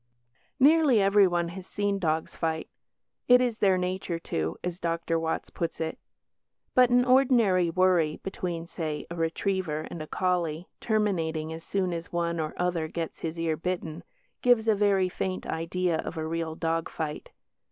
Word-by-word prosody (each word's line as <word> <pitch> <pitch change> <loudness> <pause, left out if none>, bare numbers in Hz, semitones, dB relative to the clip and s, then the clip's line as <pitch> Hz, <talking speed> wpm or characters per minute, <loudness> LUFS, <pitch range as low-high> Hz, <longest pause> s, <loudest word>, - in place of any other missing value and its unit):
Nearly 290 -3 +5
everyone 195 -4 +3
has 185 +1 -9
seen 205 -1 -1
dogs 160 -3 -1
fight 160 -1 -2 0.6
"it 250 0 +8
is 245 -3 0
their 190 -2 +4
nature 180 -1 -2
to", 80 - -3
as 180 0 -3
Dr. 165 -1 -1
Watts 160 0 -3
put 165 -1 -3
it. 160 0 -3 0.7
But 250 -1 +6
an 245 0 +4
ordinary 240 -9 +4
worry 175 -3 +2
between 175 -3 -4
(say) 155 -3 -4
a - - -4
retriever 165 -1 -1
and 170 - -6
a 155 - -6
collie, 175 -2 -1
terminating 165 -8 0
as 165 0 -8
soon 185 -3 -1
as 165 0 -6
one 170 -1 -1
or 155 -1 -3
other 175 -3 0
gets 165 0 -5
his 165 0 -4
ear 165 -1 0
bitten, 170 -1 -4 0.4
gives 240 -3 +4
a 220 - +5
very 200 -2 +3
faint 185 +1 -3
idea 165 +1 -1
of 175 - -5
a 160 - -2
real 165 0 -3
dog 165 0 -1
fight. 155 -2 -5
175 Hz, 165 wpm, -27 LUFS, 165-195 Hz, 0.7 s, it